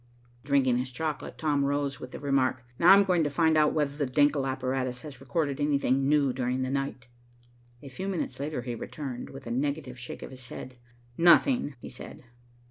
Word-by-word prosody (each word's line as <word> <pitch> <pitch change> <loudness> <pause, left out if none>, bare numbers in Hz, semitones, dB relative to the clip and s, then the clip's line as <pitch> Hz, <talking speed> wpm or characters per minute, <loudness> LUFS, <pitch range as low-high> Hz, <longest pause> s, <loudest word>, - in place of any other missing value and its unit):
Drinking 130 -3 +2
his 130 +1 -3
chocolate, 150 +4 -4
Tom 145 -3 +1
rose 140 -1 -1
with 125 - -8
the - - -8
remark, 135 -3 +1 0.2
"Now 175 +2 +7
I'm 200 +1 +8
going 180 -4 +2
to 145 - 0
find 160 +2 +2
out 150 -1 +4
whether 145 -2 0
the 145 -3 -2
Denckel 145 0 +3
apparatus 130 -1 -2
has 135 -4 -9
recorded 140 +1 -1
anything 140 -2 +2
new 145 -3 +3
during 130 0 -1
the 130 - -2
night." 135 -3 -3 0.8
A - - -9
few 185 +9 -6
minutes 170 -9 -3
later 145 -3 -3
he 120 -1 -4
returned, 125 +2 -6
with 135 0 -10
a 115 - -5
negative 135 0 -2
shake 125 - -7
of - - -8
his 130 -1 -11
head. 125 0 -9 0.4
"Nothing," 175 - +5
he - - -9
said. - - -10
140 Hz, 195 wpm, -28 LUFS, 130-150 Hz, 0.8 s, I'm